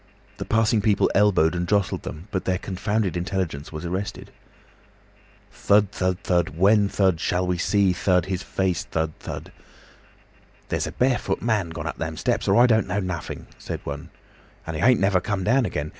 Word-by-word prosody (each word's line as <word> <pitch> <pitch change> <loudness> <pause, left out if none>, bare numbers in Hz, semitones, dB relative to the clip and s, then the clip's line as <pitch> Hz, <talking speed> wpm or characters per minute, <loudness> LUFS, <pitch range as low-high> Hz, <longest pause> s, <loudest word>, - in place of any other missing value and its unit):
The - - -5
passing 110 0 +2
people 105 -1 +2
elbowed 100 -5 +4
and 90 0 -2
jostled 100 -2 +1
them, 80 +6 -8
but 95 -3 -2
their 90 -1 +1
confounded 100 +1 -2
intelligence 90 -5 -3
was 80 +2 -6
arrested. 95 +4 -4 1.2
'Thud, 100 -1 +2
thud, 90 -2 -1
thud, 85 -3 0
when, 100 +2 +4
thud, 95 -5 +2
shall 90 +2 0
we 90 -1 -1
see, 100 -1 +2
thud, 90 0 +2
his 95 -1 -3
face, 95 -4 -1
thud, 80 -1 -2
thud.' - - -7 1.2
'There's - - -1
a - - -5
barefoot 125 0 0
man 105 -7 0
gone 80 - -6
up - - -5
them - - -4
steps, - - -1
or - - +4
I 120 - +8
don't 110 -4 +3
know 95 +2 -1
nothing,' 90 -5 -5
said - - -5
one. - - -6 0.6
'And 80 - -5
he - - -3
ain't 125 -1 +5
never 95 -2 +2
come 100 -1 -2
down 125 +3 +3
again. 75 +1 -3
95 Hz, 180 wpm, -24 LUFS, 90-105 Hz, 1.2 s, I